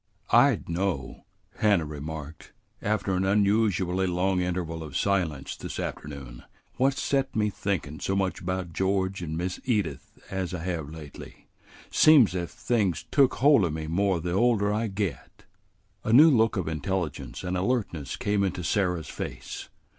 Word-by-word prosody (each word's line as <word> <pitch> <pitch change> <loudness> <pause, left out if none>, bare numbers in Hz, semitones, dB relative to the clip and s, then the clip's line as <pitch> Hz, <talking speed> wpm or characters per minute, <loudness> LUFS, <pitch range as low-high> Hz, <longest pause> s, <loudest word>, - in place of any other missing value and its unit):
"I - - +6
d' - - -12
know," 85 -6 -3 0.3
Hannah 100 -6 +3
remarked, 75 +1 -7 0.3
after 100 -2 0
an 95 +1 +1
unusually 100 -2 +2
long 90 +1 +1
interval 85 -2 -2
of 75 -4 -5
silence 80 -7 0
this - - -6
afternoon, 65 -4 -6 0.4
"what's 135 +1 +2
set 135 -1 0
me 105 -1 +1
thinkin' 80 -8 -3
so 95 - -1
much 95 -2 -1
'bout 90 -1 -3
George 95 +1 0
and 80 -2 -4
Miss 90 +1 -3
Edith 105 -9 -2
as 95 -2 -2
I 80 - -5
hev' 85 -5 -3
lately. 75 -3 -11 0.4
Seems 140 - +6
ef 85 -2 -3
things 100 -9 -1
took 140 -3 +4
hold 140 -5 +5
o' 85 - +1
me 80 0 -4
more 90 +3 +1
the 85 +2 -3
older 105 0 +2
I 110 +2 0
get." 95 -9 -4 0.6
A 110 - -1
new 150 +7 +8
look 115 -4 +3
of 90 - -2
intelligence 80 +3 -3
and 90 0 -2
alertness 90 - -1
came 105 -1 0
into 95 -2 -2
Sarah's 90 -4 0
face. - - -6
95 Hz, 155 wpm, -27 LUFS, 80-105 Hz, 0.6 s, new